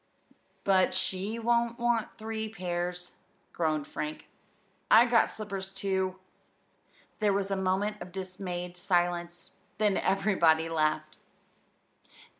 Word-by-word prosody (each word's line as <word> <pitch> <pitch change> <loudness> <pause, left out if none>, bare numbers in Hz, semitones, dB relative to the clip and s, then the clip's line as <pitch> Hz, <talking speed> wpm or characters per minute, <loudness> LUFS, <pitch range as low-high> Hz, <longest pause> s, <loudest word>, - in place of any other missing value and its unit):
"But 190 -2 +3
she 190 +3 -2
won't 235 0 +1
want 240 -2 0
three 220 0 -4
pairs," 180 -3 -4 0.4
groaned 155 -3 0
Frank; 150 +1 -5 0.6
"and - - +8
I 235 - +8
got 230 - +5
slippers 195 -3 -5
too!" 190 -1 -1 1.0
There 210 -2 +3
was 200 0 -1
a - - +2
moment 190 +3 0
of 180 - -8
dismayed 180 -1 -5
silence, 175 -1 -1 0.3
then 210 -2 +2
everybody 170 -5 +3
laughed. 155 -1 0
190 Hz, 110 wpm, -29 LUFS, 175-210 Hz, 1.0 s, and